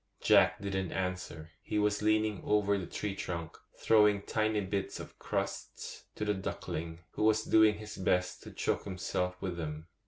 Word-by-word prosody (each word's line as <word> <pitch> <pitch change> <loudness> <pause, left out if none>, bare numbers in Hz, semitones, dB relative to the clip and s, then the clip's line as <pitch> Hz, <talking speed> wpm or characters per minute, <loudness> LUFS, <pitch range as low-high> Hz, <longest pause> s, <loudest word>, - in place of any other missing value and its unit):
Jack - - +5
didn't 95 -3 -2
answer; 90 -4 -4
he - - -3
was 105 0 +2
leaning 110 -1 +2
over 105 -1 +3
the 95 -3 -3
tree 105 -2 -3
trunk, 85 -3 -4 0.2
throwing 105 -2 +4
tiny 110 0 +1
bits 100 0 -2
of - - -10
crusts - - -4
to 105 - -2
the 105 - +2
duckling, 85 -3 -4
who - - -5
was 110 0 +4
doing 110 -1 +5
his 105 0 -8
best 90 -1 +1
to - - -9
choke - - -1
himself 90 -1 -2
with 90 -3 -2
them. 80 0 -5
100 Hz, 165 wpm, -32 LUFS, 90-105 Hz, 0.2 s, Jack